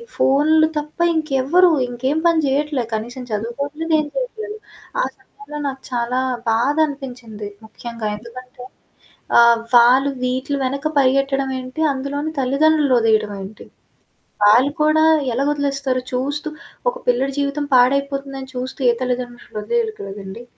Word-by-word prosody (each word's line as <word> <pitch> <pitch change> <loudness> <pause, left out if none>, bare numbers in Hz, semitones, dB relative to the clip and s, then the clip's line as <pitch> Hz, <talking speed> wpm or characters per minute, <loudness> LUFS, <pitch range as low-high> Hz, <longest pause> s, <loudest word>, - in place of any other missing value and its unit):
ఫోన్లు 310 +3 +4
తప్ప 300 +2 -5 0.2
ఇంకెవ్వరు 310 +4 +3 0.2
ఇంకేం 260 +4 -2
పని 335 -1 +3
చేయట్లే. 280 -1 0
కనీసం 240 +4 -4
చదువుకోట్లేదు, 280 +9 -3
ఏం 305 - -1
చేయట్లేదు. 440 -4 -4 0.4
ఆ - - +2
సమయంలో 420 -8 -12
నాకు 265 -1 -5
చాలా 245 +1 -1 0.3
బాధ 235 +6 +2
అనిపించింది. 245 -7 -8 0.2
ముఖ్యంగా 230 0 -6
ఎందుకంటే 250 +2 -11 0.8
ఆహ్, 235 0 +6 0.2
వాళ్ళు 250 +4 +6
వీటిలు 260 +3 -1
వెనక 275 +3 -2
పరిగెట్టడం 275 0 +2
ఏంటి? 255 +4 -6
అందులోని 285 +3 -3
తల్లిదండ్రులుని 285 +2 +3
వదిలేయడం 220 -2 +2
ఏంటి? 195 +3 -10 0.8
వాళ్ళు 240 +7 +5
కూడా 310 +1 +4 0.3
ఎలాగొదిలేస్తారు? 275 -1 0
చూస్తూ 285 +4 -2 0.4
ఒక - - -13
పిల్లడి 260 +3 +1
జీవితం 285 +1 -1
పాడైపోతుందని 275 +1 +1
చూస్తూ, 255 +3 -5
ఏ - - 0
తల్లితండ్రులు 250 -1 -4
వాదిలేయరు 460 - -1
కదండీ. 195 +3 -8
270 Hz, 120 wpm, -20 LUFS, 245-290 Hz, 0.8 s, ఆహ్